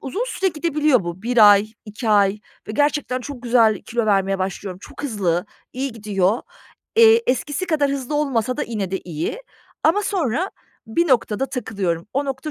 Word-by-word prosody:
uzun 385 - -3
süre 385 -5 0
gidebiliyor 300 - +1
bu. 175 +3 -6
1 230 -3 +6
ay, 210 +2 +1
2 215 +2 -5
ay 205 0 +3 0.3
ve - - -4
gerçekten 290 -1 0
çok 255 -1 -8
güzel 230 -4 +3
kilo 235 -1 -2
vermeye 195 -1 +2
başlıyorum. 185 0 -4
Çok - - -10
hızlı, 195 - -1 0.3
iyi 265 0 -3
gidiyor. 205 -1 0 0.5
Eee, 455 0 +7
eskisi 290 +7 -1
kadar 295 -4 +1
hızlı 275 +1 -3
olmasa 255 -4 0
da - - -1
yine 205 -5 -3
de 190 - -1
iyi. 170 - -4 0.4
Ama 410 +6 +3
sonra 360 - -1 0.4
bir 335 +9 0
noktada 255 0 +1
takılıyorum. 195 - -3
O 280 +1 +1
nokta 270 +2 -4
245 Hz, 170 wpm, -21 LUFS, 205-290 Hz, 0.5 s, Eee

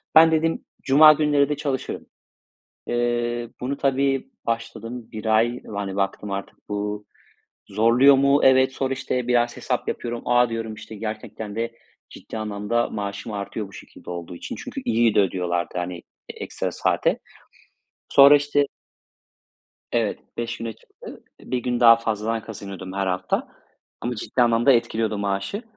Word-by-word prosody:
Ben 160 +1 +8
dedim 160 +1 0 0.2
cuma 155 +3 +8
günleri 145 -2 +2
de 150 - 0
çalışırım. 140 -3 -3 0.8
Eee, 120 0 -1
bunu 135 +3 -2
tabii 135 - +1 0.2
başladım 115 +1 -4
1 110 0 -7
ay. 115 +3 +2
Yani 100 -2 -4
baktım 100 +1 -2
artık 100 +2 -7
bu 105 0 -3 0.6
zorluyor 115 +7 +5
mu? 140 +1 +4
Evet, 130 0 +5
sonra 135 0 -2
işte 125 -1 -3
biraz 120 -1 +2
hesap - - -2
yapıyorum. 120 0 -3
A! 120 0 +4
diyorum, 115 -1 -4
işte 110 - -10
gerçekten 110 0 -6
de 115 +1 -2 0.4
ciddi - - -8
anlamda 105 +2 -1
maaşım 100 +1 -5
artıyor 100 0 -4
bu - - -17
şekilde - - -12
olduğu 85 0 -6
için. - - -7
Çünkü - - -6
iyi 115 -1 +2
de - - +5
ödüyorlardı, 90 -2 -1
hani, 90 0 -4 0.3
ekstra - - -4
saate. - - +1 0.9
Sonra 140 +1 +8
işte 145 0 +1 1.3
Evet, - - 0 0.2
5 120 0 -3
güne 115 -1 -5
çıktı. - - -14 0.2
1 130 - -3
gün 120 0 -1
daha 115 -1 +8
fazladan 115 0 -2
kazanıyordum 100 -4 -8
her 100 0 -1
hafta. 90 0 -1 0.5
Ama 120 +1 -2
ciddi 120 +3 -1
anlamda 120 +2 +4
etkiliyordu 115 -3 +1
maaşı. 100 - -2
115 Hz, 145 wpm, -23 LUFS, 105-130 Hz, 1.3 s, Ben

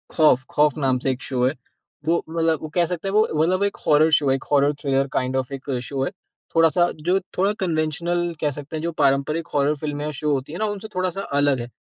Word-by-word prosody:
खौफ, 150 -5 +4
खौफ 150 -1 +2
नाम 135 -3 +1
से 135 - +3
एक 130 0 -5
शो 125 -2 -2
है, 130 - +2 0.5
वो 170 +1 +2
मतलब 165 -1 +1
वो 155 - -6
कह 175 -1 +4
सकते 175 +2 -4
है - - -1
वो 215 +1 +4
मतलब 185 +4 +2
एक 200 - -1
हॉरर 155 +2 +5
शो 145 - 0
है, 135 - +4
एक 135 - -6
हॉरर 145 0 +4
थ्रिलर 135 -1 +1
काइंड 130 +1 0
ऑफ 130 0 -2
एक 135 +1 -6
शो 135 0 -2
है। 135 - -2 0.4
थोड़ा-सा 165 +2 +4 0.2
जो 185 +2 +4 0.2
थोड़ा 195 +3 +3
कन्वेंशनल 170 0 -1
कह 150 - +2
सकते 145 +2 -8
हैं 155 - -4
जो 170 - -1
पारंपरिक 140 +3 +1
हॉरर 145 +1 +2
फिल्में 145 0 -4
या 150 - -2
शो 150 -1 0
होती 135 +2 -3
है 175 - -5
ना 215 - +1
उनसे 205 +2 -8
थोड़ा-सा 185 +1 -1 0.2
अलग 145 -2 +2
है, 120 0 -6
150 Hz, 240 wpm, -23 LUFS, 140-170 Hz, 0.5 s, हॉरर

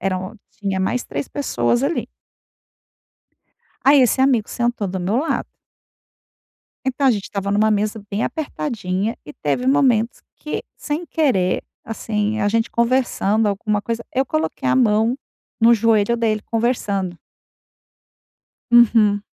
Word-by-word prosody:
Eram 185 +3 -3
tinha 195 -2 -3
mais 245 +6 -1
3 - - -5
pessoas 240 - 0
ali. 310 +4 -1 1.8
Aí, 275 0 +6
esse 255 +2 +3
amigo 255 -6 +3
sentou 240 -4 -1
do 185 0 -4
meu 195 +7 0
lado. 315 +4 -1 1.4
Então, 265 +1 0
a - - +6
gente 205 -3 -2
estava 200 0 -3
numa 215 +2 +3
mesa 215 +1 0
bem 205 +2 -1
apertadinha 230 -8 -3
e 150 - -8
teve 200 - -2
momentos 245 -4 +2
que, 300 - -5
sem 305 +4 -4
querer, 245 - +1 0.2
assim, 215 -1 -2
a 205 - +1
gente 225 +2 0
conversando 235 -3 +1
alguma 205 +1 -1
coisa 230 +1 -3
eu 265 +1 +1
coloquei 155 - -2
a - - +3
mão 225 0 +3 0.4
no 230 +1 +6
joelho 225 +1 +2
dele, 215 -2 0
conversando. 205 -6 -1 1.6
Uhum. 220 -4 +5
225 Hz, 130 wpm, -20 LUFS, 200-245 Hz, 1.8 s, Aí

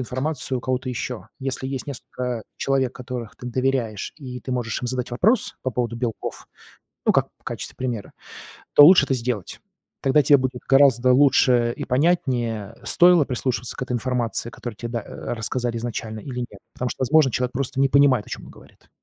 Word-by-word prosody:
информацию 130 +1 -2
у - - -7
кого-то 130 +1 -2
ещё. 125 -1 -4
Если 130 0 -3
есть 135 0 -4
несколько 125 -3 -5
человек, 135 -2 0
которых 125 -3 -6
ты 125 - -9
доверяешь, 125 -5 -1
и 125 -4 -8
ты 130 - -5
можешь 120 -3 -2
им - - -1
задать 125 -1 -3
вопрос 215 - +1
по 130 - -1
поводу 120 0 -2
белков, 115 -2 -4 0.6
ну, - - +5
как - - +2
в - - -35
качестве - - -6
примера, 120 -5 -4 0.6
то 145 - +10
лучше 170 -3 +8
это 135 - +1
сделать. 115 -5 -3 0.4
Тогда 135 +2 +4
тебе 145 0 +6
будет 130 -1 -3
гораздо 130 -2 +5
лучше 125 -3 +4
и - - -4
понятнее, 125 - 0
стоило 175 -3 +5
прислушиваться 125 -2 -3
к - - -5
этой 125 - -4
информации, 120 -2 -1
которую 120 -3 -7
тебе 115 +3 -6
да 115 - -1
э, - - -11 0.2
рассказали 120 +1 -2
изначально 110 -2 -5
или 125 0 -5
нет. 105 -5 -7
Потому 125 -1 -3
что, - - -6
возможно, 135 0 +4
человек 125 0 -1
просто 135 +1 -2
не 135 - +4
понимает, 135 -6 +4
о - - -13
чём - - -6
он - - -12
говорит. - - -19
125 Hz, 190 wpm, -23 LUFS, 120-135 Hz, 0.6 s, то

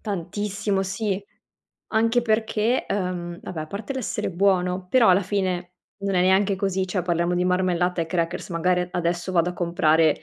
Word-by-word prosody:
Tantissimo, 200 0 -2
sì. 195 0 -2 0.7
Anche 230 +2 +3
perché, 220 +1 +1
uhm, 180 -3 -3
vabbè, 165 -3 -6
a - - -7
parte 205 - -5
l'essere 255 -6 -2
buono, 180 0 +1
però 245 -1 +5
alla 185 +2 +5
fine 180 -2 -2 0.3
non 195 -1 -1
è 180 - +3
neanche 190 +1 +3
così 190 -1 -1
cioè 180 -1 -1
parliamo 170 0 0
di 180 - +1
marmellata 180 -1 +1
e 165 - -1
crackers, 170 +1 -2
magari 180 +1 +1
a 180 - -3
adesso 175 +1 -1
vado 175 0 +2
a - - -6
comprare 160 -3 +2
185 Hz, 170 wpm, -24 LUFS, 175-200 Hz, 0.7 s, però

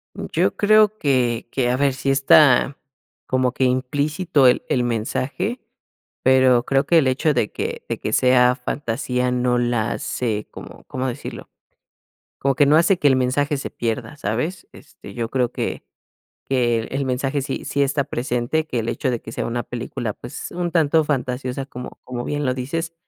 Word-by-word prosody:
Yo - - -1
creo 215 0 +4
que 125 - 0
que, 125 -3 0
a 125 - +1
ver, 140 0 +2
sí 135 +1 -3
está 135 0 +5 0.5
como 130 -1 +1
que 130 - +1
implícito 145 +4 +1
el 125 - +3
el 125 - +1
mensaje, 130 - -2 0.6
pero 130 -2 +5
creo 135 +2 +1
que 170 - +4
el 135 - +2
hecho 140 +4 +1
de 115 -4 0
que - - -4
de - - -3
que - - -3
sea 125 -1 +4
fantasía 125 0 -2
no 125 0 +1
la 120 -3 0
hace 105 +1 -3
como, - - -11
¿cómo 130 0 -3
decirlo?, 130 +2 -7 0.9
como 135 -1 +1
que 145 - +4
no 145 +2 +5
hace 170 +3 +4
que 145 - +3
el 135 - +5
mensaje 140 +3 0
se 135 - -5
pierda, 115 +5 -3
¿sabes? 145 - -3
Este, 150 - -14
yo 115 -2 -3
creo 125 -2 0
que - - -4 0.7
que 120 -3 +2
el 135 +5 -3
mensaje 135 +2 -1
sí 135 - -4
sí 140 - 0
está 140 0 +1
presente, 125 +5 -1
que 125 - -3
el 115 - -4
hecho 130 - -1
de 120 - -2
que 110 - -10
sea - - -3
una 120 0 -2
película, 120 -2 -5
pues, 120 - -8
un 175 0 -2
tanto 160 -1 +3
fantasiosa, 130 -2 -2
como 125 -2 -9
como 120 -1 -5
bien 145 -1 -2
lo 125 - +1
dices, 160 +6 -4
130 Hz, 180 wpm, -21 LUFS, 125-145 Hz, 0.9 s, está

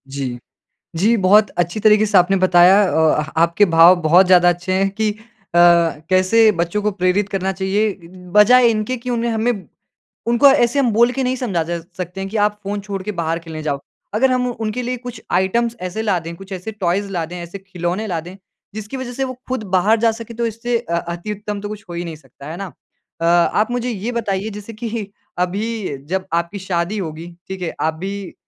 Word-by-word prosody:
जी। 130 -3 -3 0.6
जी, 215 +8 +3
बहुत 210 +1 +4
अच्छी 175 +4 0
तरीके 215 0 +5
से 205 -2 +4
आपने 180 +2 +3
बताया। 185 0 +6 0.2
औ 160 +1 +3
अह 155 0 -3
आपके 170 +4 +4
भाव 165 0 +7
बहुत 175 +4 +5
ज़्यादा 180 -1 +6
अच्छे 175 +1 -1
हैं 195 +1 +2
कि 215 +2 -1
अ, 205 - -7 0.4
कैसे 175 +5 +4
बच्चों 170 +4 -1
को 210 - +1
प्रेरित 190 +1 0
करना 190 -1 -1
चाहिए, 195 +3 0 0.4
बजाए 240 +5 +6
इनके 220 +3 -1
कि 250 +1 -6
उन्हें 235 -1 0
हमें 225 +2 +1 0.8
उनको 235 +4 +5
ऐसे 270 -1 +4
हम 250 -4 +2
बोल 235 +3 +4
के 265 +1 -2
नहीं 255 0 0
समझा 200 -10 -1
जा 170 +1 -3 0.2
सकते 180 +1 -5
हैं 195 - -4
कि 220 - -3
आप 210 0 +1
फ़ोन 200 +1 -3
छोड़ 200 -1 -5
के 210 - -3
बाहर 165 -3 -2
खेलने 160 -2 -8
जाओ। 145 -2 -2 0.3
अगर 255 +5 +3
हम 250 0 +1
उनके 225 +1 -4
लिए 250 +1 -3
कुछ 245 -1 -9
आइटम्स 230 +6 +1
ऐसे 185 +4 -4
ला 205 -4 +1
दें 165 0 -8
कुछ 195 +3 -13
ऐसे 185 +4 -6
टॉयज़ 200 -1 -1
ला 170 -3 -2
दें 175 +3 -9
ऐसे 175 +2 -7
खिलौने 185 +2 -4
ला 175 -4 -2
दें, 175 +3 -11 0.4
जिसकी 215 +4 -6
वजह 260 -2 -5
से 270 - -2
वो 260 -1 -3
खुद 255 -3 -3
बाहर 215 +5 +3
जा 230 0 +3
सकें 230 +1 -9
तो 235 - 0
इससे 230 +2 -2
अ, 170 -8 -3
अति-उत्तम 205 +4 -5
तो 205 - -5
कुछ 210 0 -8
हो - - -6
ही 170 0 -3
नहीं 165 -2 -6
सकता, 140 -1 -14
है 165 - -6
ना? 195 - -5 0.6
अ, - - 0
आप 175 +6 +3
मुझे 245 0 -2
ये 225 +1 -3
बताइए 215 -3 -2
जैसे 210 +1 -9
कि 220 -2 -5 0.3
अभी 195 -1 -2
जब 190 +2 -2
आपकी 170 +4 -1
शादी 185 +2 -2
होगी। 165 -3 -5 0.2
ठीक 190 -1 -6
है? 170 - -3
आप 160 - +1
भी 195 +3 -6
195 Hz, 215 wpm, -19 LUFS, 175-220 Hz, 0.8 s, भाव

